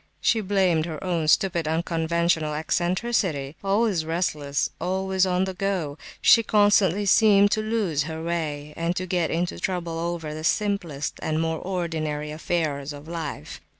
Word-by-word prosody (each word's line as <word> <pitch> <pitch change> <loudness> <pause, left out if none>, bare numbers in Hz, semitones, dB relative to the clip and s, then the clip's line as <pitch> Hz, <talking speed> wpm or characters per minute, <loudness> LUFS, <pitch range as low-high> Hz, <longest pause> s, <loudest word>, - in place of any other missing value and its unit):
She 225 - +2
blamed 185 -5 +1
her 160 +2 -6
own 170 -4 -1
stupid 170 0 +2
unconventional 165 -1 0
"eccentricity." 175 -2 -1
Always 200 -3 +1
restless, 155 -4 -1
always 190 +1 +1
on 180 0 +1
the 190 0 -3
go, 180 -6 -2 0.2
she 230 - +6
constantly 205 -3 +3
seemed 205 0 +5
to 215 - +1
lose 215 -9 0
her 160 0 -5
way, 150 -3 -3
and 170 +1 -1
to 185 - -2
get 175 -3 0
into 175 +1 -2
trouble 170 -3 -2
over 170 -2 -3
the 155 0 -6
simplest 175 -7 -1
and 155 0 -1
more 160 -1 -1
ordinary 160 -5 -3
affairs 150 -3 -2
of 145 +2 -11
life. 165 - -6
170 Hz, 150 wpm, -25 LUFS, 155-190 Hz, 0.2 s, she